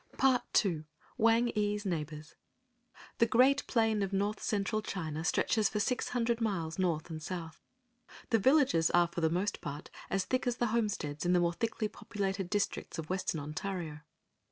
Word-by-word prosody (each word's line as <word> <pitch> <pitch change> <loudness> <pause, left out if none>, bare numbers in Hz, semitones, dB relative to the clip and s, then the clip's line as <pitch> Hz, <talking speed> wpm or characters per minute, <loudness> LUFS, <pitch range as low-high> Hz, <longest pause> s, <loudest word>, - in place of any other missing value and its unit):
*Part 260 -2 +4 0.2
II. 160 -5 -2 0.3
WANG 230 +2 +4
EE's 210 -1 -1
NEIGHBORS.* 155 -3 -4 0.9
The 230 - +5
great 255 +5 +4
plain 225 -3 +2
of 195 -1 -1
North 200 +1 -1
Central 210 +1 0
China 160 -7 -4
stretches 210 +4 +2
for 210 - -2
six 250 +4 0
hundred 235 -1 0
miles 185 -7 -1
North 170 -3 0
and 155 -1 -5
South. 165 -2 -6 0.7
The 225 - +4
villages 260 - +4
are 175 0 +4
for 170 - -4
the 160 - +3
most 185 +5 -1
part 145 +2 -6 0.2
as 195 0 0
thick 255 0 0
as 240 -1 0
the 240 - +1
homesteads 200 -10 -1
in 175 0 +2
the 180 - +5
more 170 0 +2
thickly 225 +2 -1
populated 195 -3 -3
districts 205 -3 -2
of 160 +1 -5
Western 185 -4 -1
Ontario. 155 +1 -4
195 Hz, 170 wpm, -32 LUFS, 165-225 Hz, 0.9 s, The